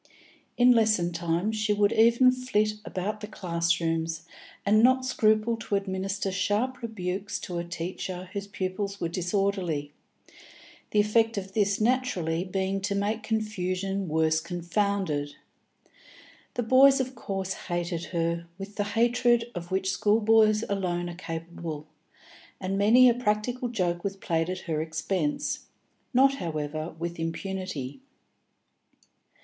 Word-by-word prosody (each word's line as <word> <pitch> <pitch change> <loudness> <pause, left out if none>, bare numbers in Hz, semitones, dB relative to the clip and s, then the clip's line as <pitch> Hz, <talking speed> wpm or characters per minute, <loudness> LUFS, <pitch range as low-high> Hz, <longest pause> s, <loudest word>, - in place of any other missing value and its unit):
In 250 0 +7
lesson 215 -7 +3
time 170 +4 0
she 215 -1 0
would 205 0 +3
even 235 +3 +6
flit 255 -4 0
about 205 +3 -3
the 210 - -6
classrooms, 170 -3 -1 0.4
and 215 +2 +5
not 260 +2 +4
scruple 220 -1 +2
to 225 -2 -2
administer 195 0 -2
sharp 210 +7 0
rebukes 200 -3 -3
to 175 -2 -4
a - - -2
teacher 180 +2 -5
whose 200 0 -4
pupils 200 +1 -3
were 170 - -1
disorderly, 180 -4 -1 1.0
the 210 - +2
effect 225 +1 +3
of 195 -1 -5
this 200 -2 +1
naturally 215 -9 +1
being 190 +1 -2
to 200 +1 -1
make 210 +2 -1
confusion 195 -3 -2
worse 160 0 +2
confounded. 175 -3 -1 1.2
The 245 - 0
boys 270 +4 +6
of 260 0 -2
course 195 -5 -3
hated 175 -1 -3
her 170 0 -2
with 200 +1 -8
the 205 - 0
hatred 240 0 +3
of 175 -1 -6
which 190 0 0
schoolboys 215 +1 +4
alone 175 -3 -1
are - - -9
capable, 165 -3 -6 0.7
and 185 +1 -2
many 225 +6 +6
a 240 - +6
practical 245 +2 -1
joke 175 -6 -1
was 195 -1 -2
played 165 -2 -1
at 185 0 -3
her 155 -3 -2
expense, 160 0 -2 0.4
not, 270 +1 +4
however, 155 - -4
with 170 +1 -4
impunity. 165 -5 -4
195 Hz, 130 wpm, -27 LUFS, 170-215 Hz, 1.2 s, In